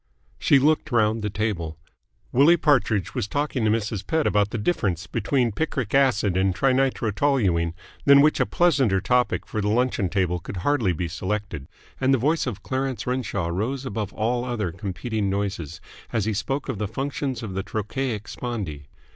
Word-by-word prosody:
She 140 - +5
looked 150 +3 +2
round 110 -1 +2
the 105 - -1
table. 95 -7 -2 0.5
Willie 145 +7 +6
Partridge 125 - +2
was - - -2
talking 145 0 -1
to - - +3
Mrs. 105 -2 -1
Pett 160 -1 +1
about 105 0 +2
the 115 - -3
difference 100 - -1
between 120 +2 0
picric 130 -3 -2
acid 125 -9 +3
and 95 0 +2
trinitrotoluene, 120 - +1 0.3
than 140 0 +8
which 150 +1 +3
a - - +2
pleasanter 135 - +3
topic 125 +5 +1
for 110 - -3
the 105 - -1
luncheon 110 -3 +1
table 90 -2 0
could 90 - -7
hardly 130 -10 +2
be 85 +1 -2
selected, 95 -4 -4 0.3
and 135 0 +3
the - - +1
voice 150 +4 +1
of 105 -5 -5
Clarence 130 -1 -2
Renshaw 115 -9 -2
rose 120 +10 -2
above 105 -3 -3
all 120 +3 0
other 115 -8 -2
competing 100 +3 -3
noises, 95 -6 -3 0.3
as 110 -4 0
he 110 - 0
spoke 135 +7 -2
of 100 - -3
the 105 - -1
functions 135 +1 -3
of 105 -4 -5
the 95 - -1
trochaic 110 +2 -3
spondee. 95 - -5
110 Hz, 170 wpm, -24 LUFS, 100-130 Hz, 0.5 s, than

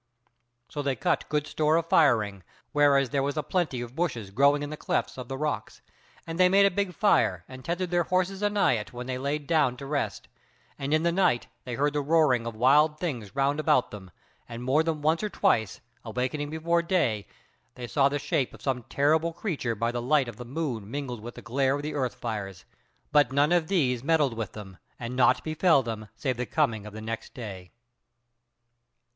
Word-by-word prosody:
So 145 - -4
they 140 -2 0
cut 175 -1 -1
good 150 -1 0
store 155 +1 +1
of 165 0 +1
firing, 110 - +3 0.3
whereas 140 -3 +3
there 140 - +1
was 140 +2 -2
a 150 - 0
plenty 155 -7 -1
of 120 +1 -8
bushes 120 - -2
growing 140 +6 +3
in 145 - -5
the - - -4
clefts - - -2
of 125 -2 -7
the 135 - -5
rocks, 150 +1 -3 0.4
and 165 +1 -6
they 180 0 +6
made 200 +1 +5
a 200 - +4
big 190 -2 -2
fire 90 - +2
and 130 0 -11
tethered 175 +4 -2
their 175 -1 +2
horses 185 +2 0
anigh 205 - +2
it 105 - -9
when 125 0 -6
they 130 0 -3
lay 140 +3 -1
down 150 -4 +1
to 140 - -8
rest; 140 0 -3 0.5
and 140 0 -3
in 155 +1 +3
the 170 - +2
night 175 -9 +2 0.2
they 125 -2 -4
heard 145 +3 +1
the 145 - 0
roaring 140 -6 +3
of 115 - -5
wild 150 +6 +4
things 130 - -4
round 140 +2 +1
about 130 -4 +2
them, 95 -3 -9 0.4
and 120 +1 -7
more 135 +5 +3
than 160 -2 -2
once 160 +2 +2
or 210 - -2
twice, 115 - +1 0.2
awakening 125 +6 -3
before 165 +2 +1
day, 160 - 0 0.5
they 125 - -6
saw 135 +3 +2
the 145 - -1
shape 140 -2 -1
of - - -16
some 130 -3 -1
terrible 160 +4 +2
creature 160 - -3
by 115 +3 -1
the 120 0 -3
light 135 +1 +2
of 115 - -8
the 125 - -7
moon 125 -6 -4
mingled 125 -3 -5
with 120 +2 -8
the - - -10
glare 135 +2 +1
of 145 - -5
the 150 0 -3
earth 130 -4 -1
fires, 100 -6 -5 0.5
but 145 -4 +4
none 145 +3 +3
of 175 -2 +3
these 130 -11 +1
meddled 150 -4 +2
with 115 -3 -5
them, 95 -4 -10 0.2
and 120 +1 -5
naught 130 - +3
befell 155 -2 +3
them 110 -2 -6
save 125 +2 -2
the 125 - -3
coming 115 -9 0
of 105 - -10
the 110 - -7
new 115 +1 -3 0.2
day. 95 -7 -8
140 Hz, 210 wpm, -27 LUFS, 120-155 Hz, 0.5 s, they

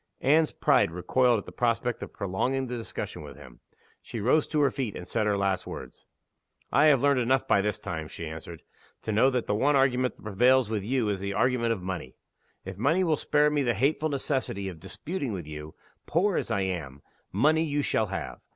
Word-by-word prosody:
Anne's 155 +3 +4
pride 140 - +3
recoiled 120 +8 +2
at 100 - -6
the - - -10
prospect 120 0 0
of - - -6
prolonging 125 +7 -1
the 125 0 -4
discussion 115 -2 -5
with - - -10
him. 65 -4 -14 0.4
She 115 - -7
rose 130 +8 +2
to 155 - -1
her 140 -2 +3
feet, 125 -7 -3
and 90 - -7
said 110 -2 0
her 105 -1 +2
last 95 -2 0
words. - - -9 0.6
"I 140 +4 +5
have 145 -5 +5
learned 140 -2 +3
enough 130 +2 +1
by 100 - +4
this 105 +1 -1
time," 80 -7 -5
she 85 - -7
answered, 80 +1 -8 0.4
"to 110 - -2
know 115 +5 +4
that 125 -3 -1
the - - 0
one 140 +8 +2
argument 130 -2 +2
that - - -20
prevails 120 +3 +3
with 105 -3 -1
you 120 +1 0
is 100 -2 -1
the 100 +1 -3
argument 115 +2 +2
of 95 -5 -7
money. 90 -8 -5 0.5
If 95 0 -7
money 160 - +2
will 160 -3 +2
spare 150 +1 +2
me 150 -1 +1
the 120 -3 +1
hateful 155 +3 +1
necessity 130 -8 -2
of 85 -4 -10
disputing 140 - -5
with 90 -5 -5
you 75 0 -8 0.3
poor 185 +4 +2
as - - -1
I 110 -4 0
am, 80 -8 -4 0.3
money 155 - +3
you 145 -2 -1
shall 110 - +1
have. 95 - -5
115 Hz, 215 wpm, -27 LUFS, 95-135 Hz, 0.6 s, I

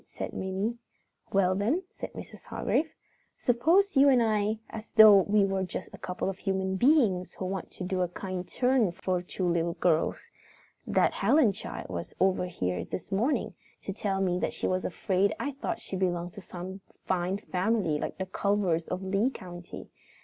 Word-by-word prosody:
said - - -6
Minnie. 195 +5 -2 0.5
"Well, 190 -2 +3
then," 230 - 0 0.2
said - - -6
Mrs. - - -10
Hargrave, 320 +1 -1 0.5
"suppose 325 +12 +3
you 275 +1 +7
and 250 -3 +5
I 215 -1 +1
talk - - -8
as 220 -1 -8
though 215 -3 +9
we 205 +1 +3
were 195 -1 -1
just 185 - -4
a - - -10
couple 180 0 -3
of 195 0 -3
human 190 -1 -1
beings 225 - +3
who 190 - -4
want 190 -1 -4
to - - -8
do 185 0 -1
a 180 - +2
kind 185 0 -5
turn 250 -6 +2
for 185 -1 -1
two 180 +1 -3
little 170 0 +1
girls. 165 -3 0 0.6
That - - +3
Helen 280 -8 +4
child 195 - -7
was 85 -1 -6
over 185 -1 +2
here 90 - -2
this 185 - -7
morning, 230 +10 0 0.3
to 195 - -4
tell 195 -1 -1
me 180 -1 +1
that - - -1
she - - -3
was 185 0 0
afraid 190 +3 +1
I 285 - -2
thought 285 +5 -4
she - - -6
belonged 175 -2 -1
to 200 - -9
some 185 +2 -8 0.2
fine 185 +1 0
family 185 -5 0
like - - -4
the 190 - -2
Culvers 190 -4 0
of 185 - -3
Lee 195 +6 +1
County. 175 -7 -9
190 Hz, 185 wpm, -29 LUFS, 180-220 Hz, 0.6 s, though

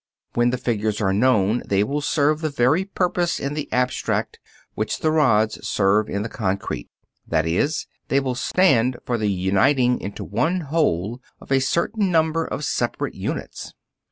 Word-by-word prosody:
When 120 0 +3
the 125 - -1
figures 110 -4 -1
are 95 -3 +1
known, 110 0 +2
they 100 0 +1
will 140 +7 -2
serve 150 +1 +1
the 155 - 0
very 140 +7 +2
purpose 180 -3 0
in 140 +1 -3
the 150 -1 -5
abstract 125 0 -1 0.3
which 110 - -2
the 155 - +2
rods 110 -9 +2
serve 105 +2 +1
in 100 +1 -2
the - - -3
concrete; 95 - -3 0.4
that 80 - +1
is, 145 - 0 0.2
they 140 - +2
will 130 -2 -2
stand 130 -4 +2
for 120 -2 -1
the 105 -1 0
uniting 110 +7 +2
into 100 - -6
one 180 +3 0
whole 125 - -1 0.2
of - - -14
a 135 - +4
certain 190 - 0
number 160 -1 +2
of 145 - -4
separate - - -2
units. - - -5
125 Hz, 165 wpm, -22 LUFS, 105-155 Hz, 0.4 s, a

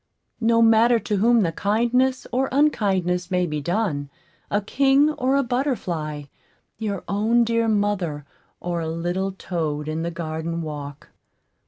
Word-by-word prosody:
No 230 0 +3
matter 230 +1 +5
to 215 -2 -2
whom 230 +3 +4
the 170 -4 +1
kindness 240 +8 +1
or 260 +2 0
unkindness 190 - +1
may 180 -1 +1
be 150 -3 -3
done 165 -4 -1 0.4
a 205 - +1
king 275 +7 +3
or 265 -2 0
a 280 - +3
butterfly, 185 - -2 0.6
your 205 -4 -3
own 220 +4 +2
dear 230 0 +1
mother 200 -9 0 0.3
or 175 -1 -3
a 160 - -3
little 175 +4 -2
toad 155 -6 -3
in 155 +1 -2
the 170 - -2
garden 165 0 -4
walk. 145 -2 -7
200 Hz, 145 wpm, -23 LUFS, 165-235 Hz, 0.6 s, matter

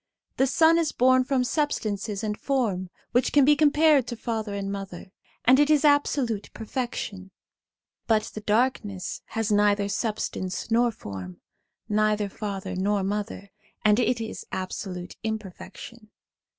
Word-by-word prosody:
The 265 - +3
sun 325 +4 +4
is 325 -2 0
born 255 +1 +4
from 265 -2 +1
substance 235 -8 -1 0.2
and 210 -1 -1
form, 210 -9 -1 0.2
which 245 - +2
can 285 -2 +5
be 295 +1 +6
compared 295 -3 +4
to 240 - -4
father 220 -3 -3
and 200 0 -3
mother, 195 -2 -7 0.3
and 255 +3 +6
it 295 0 +4
is 305 -1 +4
absolute 275 -7 +2
perfection; 220 -5 -4 0.8
but 220 -2 +3
the 215 - -6
darkness 210 -3 -1
has 225 -1 -2
neither 205 -1 +3
substance 205 -2 -3
nor 235 +1 +3
form, 95 - -8 0.5
neither 210 -1 +1
father 200 -2 -5
nor 200 +1 0
mother, 200 0 -4 0.3
and 210 +1 +5
it 245 0 +1
is 225 -1 -5
absolute 185 -1 -5
imperfection. 220 +1 -7
215 Hz, 135 wpm, -26 LUFS, 200-255 Hz, 0.8 s, be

